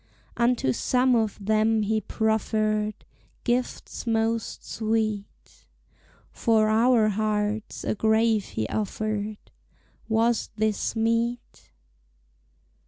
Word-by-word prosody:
Unto 235 Hz, -, +2 dB
some 255 Hz, -, +2 dB
of 220 Hz, -3 st, 0 dB
them 215 Hz, +1 st, +2 dB
he 215 Hz, +1 st, 0 dB
proffered 215 Hz, 0 st, 0 dB, 0.5 s
Gifts 245 Hz, 0 st, -2 dB
most 225 Hz, 0 st, -1 dB
sweet; 215 Hz, -2 st, -3 dB, 0.6 s
For 220 Hz, -2 st, +2 dB
our 225 Hz, 0 st, +4 dB
hearts 215 Hz, 0 st, -2 dB
a -, -, 0 dB
grave 220 Hz, 0 st, +2 dB
he 110 Hz, -, -3 dB
offered, 215 Hz, 0 st, -3 dB, 0.7 s
Was 225 Hz, +1 st, +1 dB
this 215 Hz, +1 st, -1 dB
meet? 230 Hz, +2 st, -1 dB
220 Hz, 90 wpm, -26 LUFS, 215-230 Hz, 0.7 s, our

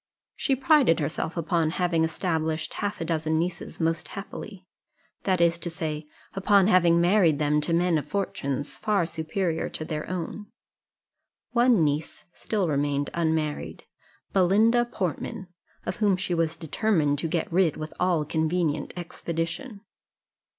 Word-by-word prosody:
She 270 Hz, -, +1 dB
prided 265 Hz, -, +4 dB
herself 160 Hz, +3 st, -2 dB
upon 165 Hz, -1 st, +1 dB
having 175 Hz, -3 st, +2 dB
established 160 Hz, -1 st, -1 dB
half 205 Hz, 0 st, -3 dB
a 165 Hz, -, -2 dB
dozen 160 Hz, -1 st, 0 dB
nieces 170 Hz, +2 st, -3 dB
most 165 Hz, 0 st, 0 dB
happily, 195 Hz, -1 st, -8 dB, 0.6 s
that 185 Hz, -2 st, +2 dB
is 170 Hz, 0 st, +3 dB
to 170 Hz, -, -3 dB
say, 155 Hz, -3 st, -4 dB, 0.3 s
upon 195 Hz, 0 st, +4 dB
having 175 Hz, -4 st, +5 dB
married 175 Hz, -3 st, +4 dB
them 150 Hz, 0 st, +2 dB
to 160 Hz, -, -2 dB
men 170 Hz, -1 st, +3 dB
of 145 Hz, -, -8 dB
fortunes 145 Hz, -6 st, -3 dB
far 205 Hz, -5 st, +1 dB
superior 165 Hz, +1 st, -2 dB
to 155 Hz, -, -6 dB
their 155 Hz, -1 st, -4 dB
own. 185 Hz, +3 st, -4 dB, 1.0 s
One 240 Hz, -6 st, +4 dB
niece 150 Hz, +1 st, -2 dB
still 205 Hz, -5 st, -1 dB
remained 145 Hz, -1 st, 0 dB
unmarried 160 Hz, -3 st, -1 dB, 0.5 s
Belinda 215 Hz, +6 st, +4 dB
Portman, 185 Hz, -3 st, -4 dB, 0.4 s
of -, -, -3 dB
whom 205 Hz, -4 st, +3 dB
she 185 Hz, -1 st, -2 dB
was 165 Hz, -1 st, 0 dB
determined 160 Hz, -3 st, +1 dB
to 165 Hz, -, -1 dB
get 165 Hz, 0 st, -2 dB
rid 175 Hz, -4 st, +3 dB
with 155 Hz, 0 st, -6 dB
all 175 Hz, -4 st, +2 dB
convenient 160 Hz, 0 st, 0 dB
expedition. 175 Hz, +6 st, -4 dB
170 Hz, 140 wpm, -26 LUFS, 160-190 Hz, 1.0 s, having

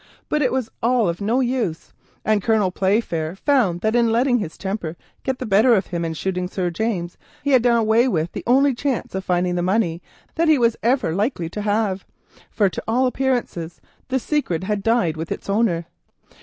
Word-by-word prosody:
But 300 Hz, -, +1 dB
it 260 Hz, -, +2 dB
was 260 Hz, -3 st, -1 dB
all 235 Hz, -2 st, +2 dB
of 170 Hz, +3 st, -3 dB
no 230 Hz, +6 st, +1 dB
use, 240 Hz, -10 st, -2 dB, 0.3 s
and 215 Hz, -1 st, +2 dB
Colonel 215 Hz, -3 st, +2 dB
Playfair 185 Hz, -4 st, 0 dB
found 195 Hz, -7 st, +1 dB
that 220 Hz, +2 st, +1 dB
in 235 Hz, -1 st, +3 dB
letting 245 Hz, +2 st, +2 dB
his 160 Hz, -7 st, -5 dB
temper 190 Hz, -4 st, -4 dB, 0.2 s
get 265 Hz, -1 st, -2 dB
the 255 Hz, -, -5 dB
better 220 Hz, +4 st, +5 dB
of 190 Hz, -3 st, +1 dB
him 170 Hz, -2 st, -3 dB
and 160 Hz, -1 st, -3 dB
shooting 180 Hz, 0 st, -2 dB
Sir 180 Hz, -1 st, -2 dB
James, 175 Hz, -2 st, -3 dB, 0.2 s
he 285 Hz, -, 0 dB
had 260 Hz, -3 st, +6 dB
done 235 Hz, 0 st, +3 dB
away 225 Hz, +2 st, +3 dB
with 165 Hz, -7 st, -1 dB
the -, -, -6 dB
only 270 Hz, +3 st, +4 dB
chance 260 Hz, 0 st, -2 dB
of 190 Hz, 0 st, -3 dB
finding 180 Hz, -1 st, 0 dB
it 180 Hz, -2 st, 0 dB, 0.3 s
that 335 Hz, +1 st, +1 dB
he 310 Hz, -2 st, +5 dB
was 235 Hz, -2 st, +2 dB
ever 240 Hz, -8 st, +1 dB
likely 195 Hz, -3 st, -1 dB
to 210 Hz, -, -5 dB
have, 205 Hz, -2 st, 0 dB, 0.5 s
for 205 Hz, -, +2 dB
to 185 Hz, -, -4 dB
all 245 Hz, +4 st, +2 dB
appearance 255 Hz, -1 st, 0 dB, 0.5 s
the 265 Hz, -, 0 dB
secret 240 Hz, -, -1 dB
had 205 Hz, +1 st, -1 dB
died 225 Hz, -7 st, +1 dB
with 160 Hz, +1 st, -5 dB
its -, -, -5 dB
owner. 200 Hz, -5 st, +1 dB
215 Hz, 195 wpm, -21 LUFS, 180-245 Hz, 0.5 s, had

